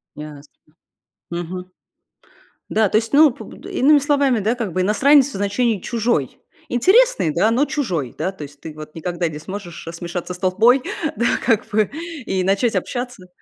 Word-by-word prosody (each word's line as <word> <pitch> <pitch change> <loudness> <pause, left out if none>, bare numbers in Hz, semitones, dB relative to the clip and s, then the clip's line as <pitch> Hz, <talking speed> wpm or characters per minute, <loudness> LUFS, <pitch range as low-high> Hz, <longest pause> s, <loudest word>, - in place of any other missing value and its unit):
Ясно. 150 -1 -9 0.9
Мгм. 180 +2 -5 1.0
Да, 215 -2 +2
то - - +3
есть, 225 +2 -2
ну, 300 -1 +7
п - - -11
м, - - -13
иными 290 +3 +3
словами, 280 -4 +2
да, 220 +4 0
как 220 -8 -4
бы 185 - 0
иностранец 260 +8 +4
в 280 - -9
значении 205 +2 0
чужой. 225 - -1 0.3
Интересный, 375 - +3
да, 210 +8 +2
но 265 +5 +2
чужой, 180 - -3
да, 190 - -1
то 190 -6 -10
есть 145 0 -12
ты 155 - -8
вот 155 0 -11
никогда 175 +1 -2
не 155 -2 -6
сможешь 175 -1 -8
смешаться 175 +1 -5
с 180 - -11
толпой, 220 +8 +4 0.3
да, 235 +3 +1
как 225 -4 +2
бы 210 -1 +1 0.3
и 185 -1 -1
начать 200 +5 +1
общаться. 245 -7 -4
205 Hz, 170 wpm, -20 LUFS, 175-245 Hz, 1.0 s, ну